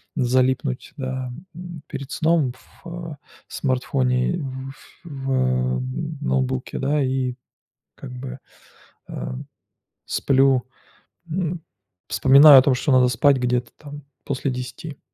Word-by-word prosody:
залипнуть, 130 Hz, 0 st, 0 dB
да, 130 Hz, -1 st, -4 dB, 0.2 s
м, 170 Hz, -2 st, -9 dB
перед 135 Hz, 0 st, -7 dB
сном 155 Hz, -6 st, +1 dB, 0.3 s
в, -, -, -10 dB, 0.2 s
э, -, -, -7 dB, 0.3 s
смартфоне, 130 Hz, +2 st, 0 dB, 0.3 s
ф 135 Hz, -, -16 dB
в 65 Hz, -, -1 dB, 0.4 s
ноутбуке, 65 Hz, -1 st, -1 dB
да, 145 Hz, +1 st, +1 dB
и 130 Hz, -1 st, -1 dB, 0.6 s
как 135 Hz, -, -10 dB
бы, 130 Hz, +1 st, -7 dB, 0.7 s
э, -, -, -5 dB, 0.8 s
сплю, 135 Hz, -2 st, +3 dB, 0.7 s
м, 170 Hz, 0 st, -2 dB, 0.5 s
вспоминаю 135 Hz, +5 st, +8 dB
о -, -, +1 dB
том, 135 Hz, -1 st, +3 dB
что 135 Hz, +2 st, 0 dB
надо 125 Hz, -1 st, +5 dB
спать 135 Hz, +3 st, +3 dB
где-то 125 Hz, -1 st, -1 dB
там 145 Hz, -1 st, -10 dB, 0.2 s
после 135 Hz, 0 st, -2 dB
10. 125 Hz, +4 st, -7 dB
130 Hz, 110 wpm, -22 LUFS, 125-145 Hz, 0.8 s, вспоминаю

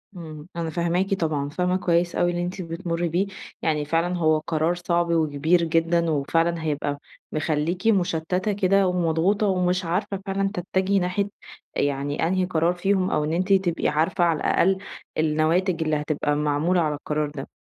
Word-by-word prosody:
إمم 155 Hz, -2 st, -9 dB
أنا 165 Hz, -1 st, -2 dB
فاهماكِ 175 Hz, +4 st, 0 dB
طبعًا، 155 Hz, -6 st, -1 dB
فاهمة 180 Hz, +4 st, 0 dB
كويس 175 Hz, -1 st, +1 dB
أوي 175 Hz, 0 st, +2 dB
اللي 175 Hz, -, -2 dB
أنتِ 180 Hz, +2 st, -4 dB
بتمري 170 Hz, 0 st, -3 dB
بيه، 185 Hz, +5 st, 0 dB, 0.3 s
يعني 150 Hz, -2 st, 0 dB
فعلًا 165 Hz, +4 st, 0 dB
هو 155 Hz, -2 st, +3 dB
قرار 160 Hz, +2 st, 0 dB
صعب 175 Hz, -1 st, 0 dB
وكبير 160 Hz, +1 st, +2 dB
جدًا، 165 Hz, +1 st, +1 dB
وفعلًا 165 Hz, +3 st, 0 dB
هيبقى 145 Hz, -2 st, -2 dB, 0.3 s
مخليكِ 160 Hz, +6 st, -1 dB
مُشتتة 180 Hz, 0 st, +1 dB
كده 195 Hz, -1 st, +3 dB
ومضغوطة، 180 Hz, +4 st, +1 dB
ومش 180 Hz, -1 st, +1 dB
عارفة 185 Hz, +3 st, -1 dB
فعلًا 195 Hz, 0 st, 0 dB
تتجهي 190 Hz, +1 st, 0 dB
ناحية 190 Hz, +3 st, -1 dB, 0.5 s
يعني 145 Hz, +2 st, 0 dB
أنهي 185 Hz, +1 st, +1 dB
قرار 170 Hz, 0 st, +1 dB
فيهم، 190 Hz, +1 st, +1 dB
أو 150 Hz, -, +1 dB
إن 155 Hz, -, -1 dB
أنتِ 185 Hz, +3 st, +2 dB
تبقي 185 Hz, -3 st, +1 dB
عارفة 165 Hz, +4 st, +1 dB
على 165 Hz, -3 st, +2 dB
الأقل 190 Hz, +5 st, +2 dB, 0.4 s
النواتج 160 Hz, +3 st, +1 dB
اللي 155 Hz, -1 st, 0 dB
هتبقى 150 Hz, 0 st, -1 dB
معمولة 150 Hz, +4 st, +1 dB
على 150 Hz, -2 st, 0 dB
القرار 150 Hz, 0 st, -2 dB
ده. 140 Hz, -2 st, -7 dB
170 Hz, 160 wpm, -24 LUFS, 155-185 Hz, 0.5 s, هو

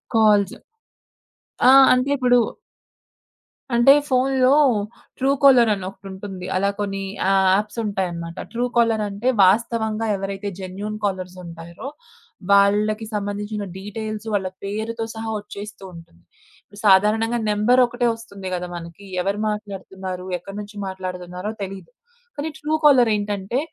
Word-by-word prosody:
Calls 210 Hz, -3 st, +4 dB, 1.2 s
ఆ! -, -, +8 dB, 0.2 s
అంటే 255 Hz, +2 st, +2 dB
ఇప్పుడు 250 Hz, -2 st, +4 dB, 1.4 s
అంటే 240 Hz, +4 st, +7 dB, 0.2 s
ఫోన్లో 260 Hz, 0 st, +3 dB, 0.6 s
ట్రూ 270 Hz, +1 st, +2 dB
కాలర్ 250 Hz, -5 st, +7 dB
అని 195 Hz, -2 st, -5 dB
ఒకటుంటుంది. 190 Hz, -1 st, -9 dB
అలా 200 Hz, +2 st, +2 dB
కొన్ని 195 Hz, -1 st, -2 dB, 0.3 s
ఆ -, -, +3 dB, 0.2 s
యాప్స్ 210 Hz, +2 st, -2 dB
ఉంటాయి 195 Hz, -3 st, -1 dB
అన్నమాట. 170 Hz, 0 st, -7 dB, 0.2 s
ట్రూ 240 Hz, +1 st, 0 dB
కాలర్ 225 Hz, -2 st, +3 dB
అంటే 200 Hz, +5 st, -4 dB, 0.2 s
వాస్తవంగా 220 Hz, +2 st, +2 dB
ఎవరైతే 195 Hz, +1 st, -4 dB
జెన్యూన్ 200 Hz, +3 st, -5 dB
కాలర్స్ 185 Hz, -2 st, -3 dB
ఉంటారో, 170 Hz, +8 st, -9 dB, 0.6 s
వాళ్ళకి 210 Hz, +2 st, +3 dB
సంబంధించిన 205 Hz, +1 st, -3 dB, 0.2 s
డీటెయిల్స్ 215 Hz, +2 st, -6 dB
వాళ్ళ 190 Hz, -2 st, 0 dB, 0.2 s
పేరుతో 220 Hz, +3 st, -3 dB
సహా 225 Hz, 0 st, -5 dB
ఒచ్చేస్తూ 205 Hz, 0 st, -10 dB
ఉంటుంది. 165 Hz, -, -15 dB, 0.4 s
ఇప్పుడు 205 Hz, 0 st, -16 dB
సాధారణంగా 215 Hz, +4 st, +4 dB
నెంబర్ 210 Hz, +5 st, +3 dB
ఒకటే 245 Hz, 0 st, -1 dB
ఒస్తుంది 200 Hz, -4 st, -10 dB
గదా 180 Hz, 0 st, -4 dB
మనకి. 170 Hz, +3 st, -9 dB, 0.2 s
ఎవరు 200 Hz, +2 st, -1 dB
మాట్లాడుతున్నారు? 190 Hz, -3 st, -6 dB
ఎక్కడి 195 Hz, +3 st, -10 dB
నుంచి 205 Hz, +1 st, -11 dB
మాట్లాడుతున్నారో 185 Hz, +1 st, -5 dB
తెలీదు. 190 Hz, -1 st, -8 dB, 0.5 s
కానీ 295 Hz, +2 st, -3 dB
ట్రూ 300 Hz, +1 st, -3 dB
కాలర్ 260 Hz, -6 st, +6 dB
ఏంటంటే, 205 Hz, +2 st, -2 dB
205 Hz, 125 wpm, -22 LUFS, 190-225 Hz, 1.4 s, ఆ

